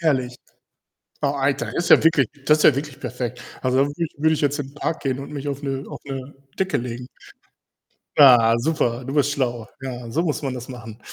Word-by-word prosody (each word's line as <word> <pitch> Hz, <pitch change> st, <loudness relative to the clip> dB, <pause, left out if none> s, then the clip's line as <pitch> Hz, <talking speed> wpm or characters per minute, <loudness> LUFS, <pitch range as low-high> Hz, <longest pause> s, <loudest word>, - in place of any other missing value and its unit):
Herrlich. 130 Hz, -6 st, 0 dB, 0.8 s
Oh, -, -, +1 dB
Alter, 135 Hz, -5 st, -1 dB
ist 170 Hz, -, -1 dB
ja -, -, +8 dB
wirklich 150 Hz, -8 st, +4 dB, 0.2 s
das 150 Hz, 0 st, +5 dB
ist -, -, 0 dB
ja 150 Hz, -, +7 dB
wirklich 140 Hz, -1 st, -5 dB
perfekt. 125 Hz, -1 st, -5 dB, 0.2 s
Also, 130 Hz, 0 st, +1 dB
da -, -, +6 dB
würde 150 Hz, +4 st, -3 dB
ich 155 Hz, -, -8 dB
würde 160 Hz, +2 st, +3 dB
ich -, -, -3 dB
jetzt 145 Hz, -1 st, +1 dB
in 135 Hz, -, -5 dB
den 140 Hz, -, -17 dB
Park 160 Hz, +2 st, -2 dB
gehen 135 Hz, -2 st, -1 dB
und 140 Hz, +2 st, -8 dB
mich 145 Hz, 0 st, -4 dB
auf 140 Hz, 0 st, -4 dB
'ne 135 Hz, -1 st, -3 dB
auf -, -, -8 dB
'ne 135 Hz, 0 st, -6 dB, 0.2 s
Decke 190 Hz, -5 st, 0 dB
legen. 125 Hz, -1 st, -5 dB, 1.1 s
Ja, 120 Hz, -5 st, +7 dB
super, 125 Hz, -3 st, 0 dB
du 135 Hz, -, -4 dB
bist 145 Hz, -1 st, +3 dB
schlau. 120 Hz, -5 st, -2 dB
Ja, 125 Hz, -3 st, -6 dB
so 160 Hz, -, 0 dB
muss 155 Hz, -3 st, -1 dB
man 135 Hz, -, -2 dB
das 125 Hz, -1 st, -7 dB
machen. 115 Hz, -4 st, -9 dB
135 Hz, 220 wpm, -22 LUFS, 125-145 Hz, 1.1 s, ja